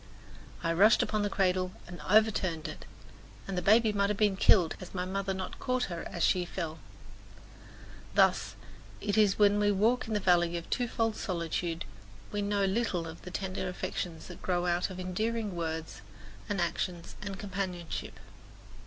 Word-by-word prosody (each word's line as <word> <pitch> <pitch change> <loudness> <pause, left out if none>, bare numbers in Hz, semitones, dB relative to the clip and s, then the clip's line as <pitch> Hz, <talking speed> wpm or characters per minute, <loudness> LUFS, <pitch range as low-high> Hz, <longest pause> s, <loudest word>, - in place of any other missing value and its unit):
I 165 - +1
rushed 215 +5 +6
upon 215 -1 -1
the 205 - 0
cradle 185 -2 +1
and 175 0 -9
over 220 +2 +6
turned 165 -5 -2
it, 155 - -8 0.6
and 195 - -3
the 180 - 0
baby 215 +3 +5
might 200 0 +2
have 210 - 0
been 205 -2 +3
killed 180 -3 +5
had 185 0 -10
my 180 0 -1
mother 195 +1 -2
not 190 -1 -5
caught 255 0 0
her 170 - -5
as 170 - -2
she 180 -2 +3
fell. 165 -2 -5 1.4
Thus - - +3 0.4
it 205 - -1
is 210 -3 +5
that - - -17
when 205 0 +5
we 205 0 +3
walk 225 +6 +2
in 220 - -1
the - - +2
valley 175 -2 +3
of 170 - -7
twofold 225 -2 0
solitude 170 -1 -2 0.5
we 205 - -1
know 200 0 +1
little 195 -4 0
of 160 0 -9
the 180 - -8
tender 185 0 -3
affections 175 -2 -4
that 180 - -10
grow 180 -1 0
out 175 +1 +1
of 185 -1 -7
endearing 210 +3 -2
words 160 -4 -4 0.5
and 205 -2 -1
actions 170 0 -2
and 200 -1 -5
companionship. 185 -4 -4
190 Hz, 175 wpm, -30 LUFS, 175-205 Hz, 1.4 s, rushed